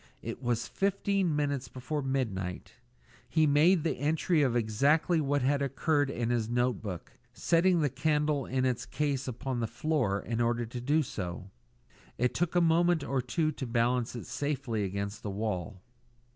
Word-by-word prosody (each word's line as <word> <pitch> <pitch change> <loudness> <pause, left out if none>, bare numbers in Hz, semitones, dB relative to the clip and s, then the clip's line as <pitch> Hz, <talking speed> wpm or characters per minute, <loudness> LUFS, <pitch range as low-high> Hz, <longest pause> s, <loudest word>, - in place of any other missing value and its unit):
It - - -5
was 120 -2 -1
fifteen 195 -3 0
minutes 140 -3 -1
before 130 +5 -4
midnight; 110 -10 -3 0.6
he 160 -1 +3
made 155 +4 +4
the 165 - -1
entry 155 +3 +2
of 130 -4 +2
exactly 140 +9 +2
what 145 -1 0
had 140 +2 +2
occurred 145 +1 +1
in 120 -3 -2
his 115 -2 0
notebook, 120 -7 -2 0.2
setting 175 0 +3
the 145 - +2
candle 150 0 0
in 130 0 0
its 125 -1 0
case 140 -3 -2
upon 130 +1 -3
the 115 - -1
floor 125 -9 0
in 115 +3 -2
order 120 0 +1
to 120 +2 -6
do 150 +5 +2
so. 95 -5 -6 0.7
It 125 +1 +1
took 175 +5 -1
a 175 - +5
moment 170 -1 +3
or 135 -2 0
two 155 +6 0
to 135 -4 -6
balance 120 +1 +1
it 120 - -6
safely 130 -3 -2
against 100 +2 -4
the 105 - -4
wall. 100 -2 -3
130 Hz, 165 wpm, -30 LUFS, 115-150 Hz, 0.7 s, a